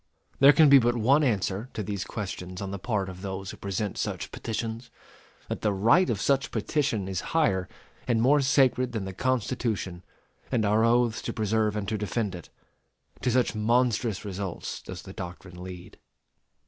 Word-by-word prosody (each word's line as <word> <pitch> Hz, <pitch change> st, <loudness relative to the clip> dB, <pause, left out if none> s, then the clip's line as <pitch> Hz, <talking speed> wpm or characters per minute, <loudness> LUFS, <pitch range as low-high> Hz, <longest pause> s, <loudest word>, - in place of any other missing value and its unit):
There 140 Hz, +1 st, +9 dB
can 155 Hz, +2 st, +6 dB
be 140 Hz, -1 st, +9 dB
but 120 Hz, 0 st, +1 dB
one 135 Hz, +7 st, +4 dB
answer 105 Hz, -2 st, 0 dB
to 105 Hz, -, -2 dB
these 100 Hz, -2 st, -3 dB
questions 90 Hz, -3 st, -6 dB
on 100 Hz, -1 st, -4 dB
the 100 Hz, -, -5 dB
part 105 Hz, -3 st, -1 dB
of 90 Hz, -1 st, -8 dB
those 95 Hz, -1 st, -5 dB
who -, -, -11 dB
present 100 Hz, +1 st, -3 dB
such -, -, -3 dB
petitions: 115 Hz, +1 st, -4 dB, 0.6 s
that -, -, -4 dB
the 105 Hz, -, +2 dB
right 115 Hz, -, +4 dB
of 105 Hz, -, 0 dB
such 135 Hz, +4 st, +1 dB
petition 140 Hz, -10 st, -1 dB
is 95 Hz, -2 st, -2 dB, 0.2 s
higher 95 Hz, -, +2 dB, 0.4 s
and 120 Hz, -2 st, +2 dB
more 140 Hz, +5 st, +4 dB
sacred 130 Hz, -2 st, +3 dB
than 105 Hz, -4 st, -2 dB
the 95 Hz, -, -5 dB
Constitution 115 Hz, -6 st, -1 dB, 0.5 s
and 115 Hz, -5 st, +1 dB
our 105 Hz, +2 st, +3 dB
oaths 115 Hz, -1 st, +3 dB
to -, -, -4 dB
preserve 110 Hz, -1 st, 0 dB
and 105 Hz, -2 st, -3 dB
to 105 Hz, 0 st, -2 dB
defend 105 Hz, -1 st, -2 dB
it. 85 Hz, -2 st, -9 dB, 0.7 s
To 125 Hz, -, +1 dB
such 125 Hz, 0 st, +2 dB
monstrous 115 Hz, -1 st, +1 dB
results 95 Hz, -2 st, -5 dB
does -, -, -8 dB
the -, -, -10 dB
doctrine 90 Hz, 0 st, -8 dB
lead. 90 Hz, -1 st, -9 dB
110 Hz, 175 wpm, -27 LUFS, 95-125 Hz, 0.7 s, There